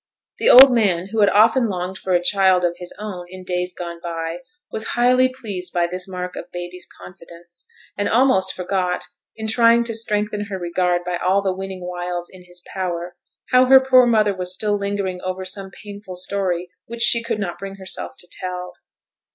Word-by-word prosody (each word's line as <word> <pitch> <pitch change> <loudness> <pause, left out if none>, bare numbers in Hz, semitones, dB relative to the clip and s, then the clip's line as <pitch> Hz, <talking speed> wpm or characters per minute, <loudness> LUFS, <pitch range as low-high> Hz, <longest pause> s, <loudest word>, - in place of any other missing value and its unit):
The - - +3
old 260 +1 +10
man, 195 -6 +1
who 225 - -2
had 205 -1 +5
often 225 +5 +4
longed 180 0 -4
for 185 - -2
a 175 - +1
child 190 -1 +3
of 175 0 -1
his 180 -1 -6
own 190 -4 -7
in 185 0 -10
days 180 0 -2
gone 170 -1 -7
by, 165 0 -4 0.3
was 220 - -3
highly 255 +1 +4
pleased 205 -9 -6
by 175 -1 +2
this 180 +2 -5
mark 180 -1 -6
of - - -8
baby's 175 0 -7
confidence, 175 -1 -12 0.3
and 205 - -1
almost 225 -6 +3
forgot, 180 -1 -2 0.3
in 220 0 -5
trying 230 +1 +4
to 235 -1 -4
strengthen 210 -2 -1
her 200 -2 -5
regard 175 0 0
by 175 0 -2
all 190 +3 +1
the 190 -1 0
winning 190 -1 -6
wiles 175 -1 -4
in 185 -1 -15
his 175 0 -12
power, 175 -2 -4 0.4
how 255 0 +6
her 265 +1 +8
poor 255 -1 +5
mother 215 -3 +3
was 180 -1 -2
still 205 +3 0
lingering 200 -2 -3
over 185 0 -4
some 195 +1 -5
painful 200 -1 -10
story 180 -1 -2 0.2
which 235 0 -1
she 235 -1 +4
could 230 -1 -3
not 175 -4 -4
bring 195 0 -7
herself 190 -2 -6
to 175 - -7
tell. 180 0 -6
185 Hz, 190 wpm, -21 LUFS, 180-210 Hz, 0.4 s, old